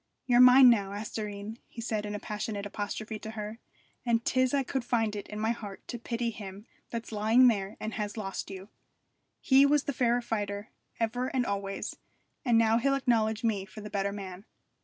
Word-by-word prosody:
'You're 245 -1 +4
mine 250 +1 +9
now, 200 -4 +1
asthoreen,' 210 +1 -5
he - - -12
said 215 -2 -2
in 205 - -4
a - - -4
passionate 210 -1 -4
apostrophe 215 +1 -4
to 220 - -7
her, 210 +2 -5 0.4
'and 235 -1 +1
'tis 255 -1 +2
I 280 -1 +2
could 265 0 -2
find 225 -3 0
it 205 - -6
in 210 - -6
my 220 +1 +1
heart 205 -4 -7
to 240 - -4
pity 235 0 -2
him 200 -1 -9 0.2
that's 230 -1 -5
lying 225 +4 +5
there 200 -3 -2
and 215 0 -4
has 210 0 -4
lost 195 -3 -4
you. 195 +1 -8 0.7
He 270 0 +6
was 290 0 +4
the 285 - -2
fair 245 -1 +2
fighter 205 -2 -3 0.3
ever 240 +3 0
and 260 -2 0
always, 200 -1 -3 0.5
and 240 -3 +4
now 225 0 +4
he'll 275 +3 +2
acknowledge 225 -4 +1
me 215 -4 +1
for 205 +2 -11
the 210 - -8
better 200 0 0
man.' 195 -1 -7
220 Hz, 195 wpm, -29 LUFS, 205-240 Hz, 0.7 s, mine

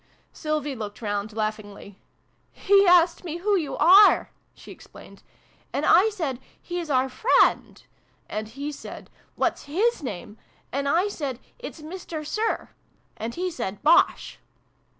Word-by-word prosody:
Sylvie 305 -3 -3
looked 210 -3 -7
round 205 0 -3
laughingly. 210 -2 -5 0.5
"He 395 0 +3
asked 350 -1 +4
me 335 -2 -5
who 405 +4 +1
you 295 -8 -2
are," 380 +6 +6 0.2
she - - -13
explained. - - -15 0.5
"And - - -1
I 375 +6 +5
said 315 - -4 0.2
'He's 345 -2 -5
out 260 -1 +1
friend' 445 - +2 0.4
And 215 0 -4
he 280 +6 -6
said 290 - -10
' - - -37
What's - - -1
his 405 +11 0
name? 210 -4 -7
' - - -36
And 280 +1 -1
I 350 +7 +2
said 280 - -5
' - - -39
It's 310 - -15
Mister 325 -1 -7
Sir: 435 +8 -2 0.5
And 230 +1 -6
he 365 +1 -2
said 200 - -5
'Bosh!'" 320 +3 +3
300 Hz, 150 wpm, -25 LUFS, 225-360 Hz, 0.5 s, are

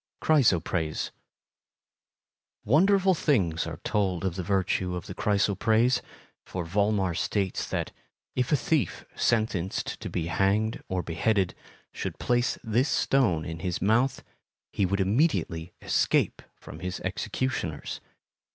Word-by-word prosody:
Chrysoprase 90 - +2 1.5
Wonderful 190 - +4
things 95 - +1
are - - -6
told 95 -4 0
of 95 - 0
the 95 - -2
virtue 95 -1 0
of 90 - -5
the - - -7
chrysoprase, 110 +4 +2 0.4
for 90 -2 -5
Volmar 100 0 +1
states 95 +3 -1
that, - - -2 0.4
if 125 +3 0
a - - +6
thief 150 +1 0
sentenced 110 -6 0
to - - -5
be 85 - -2
hanged 100 +6 +1
or 95 -1 -2
beheaded 90 +3 +1 0.4
should - - -5
place 120 0 +1
this 120 +5 +1
stone 95 -13 +2
in 80 -1 -5
his 90 +1 -2
mouth, 120 +6 +2 0.5
he 95 - +1
would 100 +2 0
immediately 95 - +1
escape - - +1
from - - -11
his 90 0 -4
executioners. 90 - -3
100 Hz, 125 wpm, -27 LUFS, 90-120 Hz, 1.5 s, a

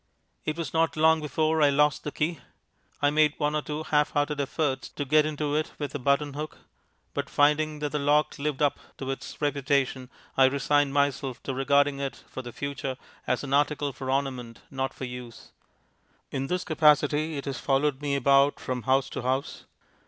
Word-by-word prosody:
It 155 +1 -2
was 165 -5 -4
not 165 -1 +1
long 160 0 +4
before 155 +1 +1
I 145 - +6
lost 145 +1 +2
the 150 - -4
key. 155 +1 -1 0.6
I 145 - +4
made 150 0 +3
one 150 0 0
or 150 - +1
two 150 +1 -4
half 150 -1 +1
hearted 145 0 0
efforts 140 -1 -2
to 145 - -5
get 155 +2 +4
into 150 -1 -2
it 155 0 -1
with 145 -2 -4
a 145 - -3
button 140 +2 +1
hook; 150 +2 -6 0.6
but, - - -3
finding 150 +1 +2
that 150 -1 -2
the 150 - -1
lock 145 +1 +2
lived 150 0 -1
up 145 - +2 0.2
to 135 0 -3
its 135 - -7
reputation, 140 -3 0 0.3
I 135 - +6
resigned 140 +1 +2
myself 140 -2 0
to 135 - -3
regarding 140 +1 +2
it 140 -1 -5
for 130 - -7
the 120 -1 -8
future 140 0 -4 0.3
as - - 0
an 140 -1 -3
article 145 0 +1
for 130 +1 -6
ornament, 130 -4 -2
not 135 -1 -2
for 130 - -6
use. 125 -1 -9 0.8
In 135 0 -2
this 180 +3 -1
capacity 150 -1 +3
it 140 - -5
has 135 -3 -4
followed 140 0 +1
me 145 -1 0
about 140 +1 +4
from 125 -1 -3
house 135 0 +3
to - - -4
house. 130 +3 -2
145 Hz, 190 wpm, -27 LUFS, 135-150 Hz, 0.8 s, I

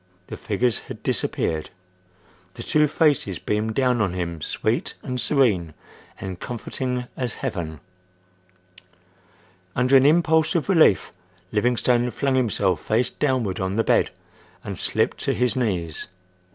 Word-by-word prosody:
the - - -7
figures 115 +1 0
had - - -10
disappeared. 80 -1 -1 0.9
The 115 - -7
two 150 +4 +3
faces 145 - +1
beamed 110 +1 -2
down 125 -2 +2
on 95 -4 0
him 85 -3 -4
sweet - - -1
and 125 -1 -3
serene 105 - +2 0.4
and 95 -2 -6
comforting 125 +1 -3
as 125 -4 -3
heaven. 80 -5 -4 2.0
Under 125 +2 +3
an 135 +1 +7
impulse 160 +1 +3
of 170 +3 0
relief 160 - +4 0.4
Livingstone 120 +2 +2
flung 135 +3 -1
himself 100 -9 +1
face 115 +3 +1
downward 130 -9 -1
on 95 +1 -2
the 115 - +2
bed - - +3 0.5
and - - -5
slipped - - 0
to - - 0
his 125 0 +1
knees. 90 -11 -1
120 Hz, 130 wpm, -23 LUFS, 95-130 Hz, 2.0 s, an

